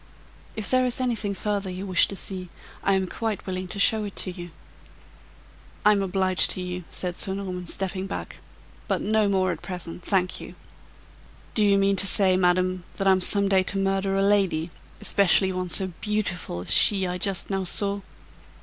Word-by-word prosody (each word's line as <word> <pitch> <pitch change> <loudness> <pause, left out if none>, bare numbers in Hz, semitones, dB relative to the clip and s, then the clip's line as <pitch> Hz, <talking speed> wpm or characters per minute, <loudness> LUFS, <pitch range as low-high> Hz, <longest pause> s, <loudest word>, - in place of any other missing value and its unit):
If 215 -3 -3
there 255 0 +2
is 245 - -4
anything 220 -6 -1
further 200 -1 -2
you 185 +2 -6
wish 185 -2 +3
to 195 - -5
see, 185 -2 -6 0.3
I 195 - +2
am 190 0 0
quite 220 +2 -4
willing 185 -1 -4
to 180 - -7
show 215 +2 +3
it 205 -1 -7
to 185 - 0
you." 175 -1 -9 1.4
"I'm 210 -1 +5
obliged 190 -1 +1
to 185 - -2
you," 180 -1 -5
said 180 -1 -5
Sir 190 -1 0
Norman, 185 -2 -6
stepping 190 +1 -3
back; - - -6 0.5
"but - - 0
no 215 0 +1
more 190 -2 +1
at 165 - -6
present, 180 -2 -8
thank 185 -2 -1
you. - - -10 1.0
Do 215 - +2
you 200 -1 +4
mean 195 0 +2
to 195 - +5
say, 190 -1 +4
madam, 185 0 +1
that 195 - -1
I'm 190 -1 +4
some 200 +2 +3
day 190 -1 +3
to 195 +1 0
murder 195 0 0
a 195 - +2
lady, 190 -5 +1 0.3
especially 190 -1 +3
one 185 -1 -4
so 185 0 +1
beautiful 205 - -3
as 90 - +6
she 195 -3 +6
I 180 0 -3
just 195 +1 -1
now 195 0 -1
saw?" 200 +2 0
190 Hz, 185 wpm, -25 LUFS, 185-200 Hz, 1.4 s, as